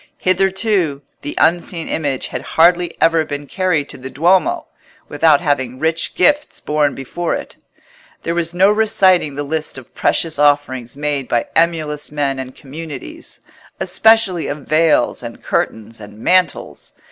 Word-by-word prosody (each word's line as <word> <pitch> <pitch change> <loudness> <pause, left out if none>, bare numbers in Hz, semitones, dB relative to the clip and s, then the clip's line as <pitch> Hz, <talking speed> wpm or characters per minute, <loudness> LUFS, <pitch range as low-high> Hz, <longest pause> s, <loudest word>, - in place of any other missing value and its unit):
Hitherto 185 -5 0 0.2
the 145 - -6
unseen 170 0 +1
Image 140 -5 -2
had - - -5
hardly 175 +1 +2
ever 165 -1 +3
been 145 -1 -6
carried 170 -3 -1
to - - -8
the 130 +1 -7
Duomo 185 - +2 0.4
without 155 -3 +3
having 130 -6 -1
rich 160 +3 -1
gifts 290 +10 +2
borne 150 -1 0
before 165 +6 -3
it. - - -8 0.7
There 170 - -1
was 170 -1 -1
no 190 +3 +4
reciting 195 -8 +3
the 145 - -3
list 155 0 -4
of 130 - -13
precious 160 -3 0
offerings 140 -4 +1
made 145 -3 -2
by 120 -1 0
emulous 155 -3 0
men 140 -2 -1
and 130 0 -7
communities, 145 - -9 0.4
especially 220 -7 +3
of 145 -1 -6
veils 160 0 +2
and - - -9
curtains 110 +1 -2
and 105 0 -12
mantles. 180 - 0
155 Hz, 145 wpm, -17 LUFS, 140-175 Hz, 0.7 s, no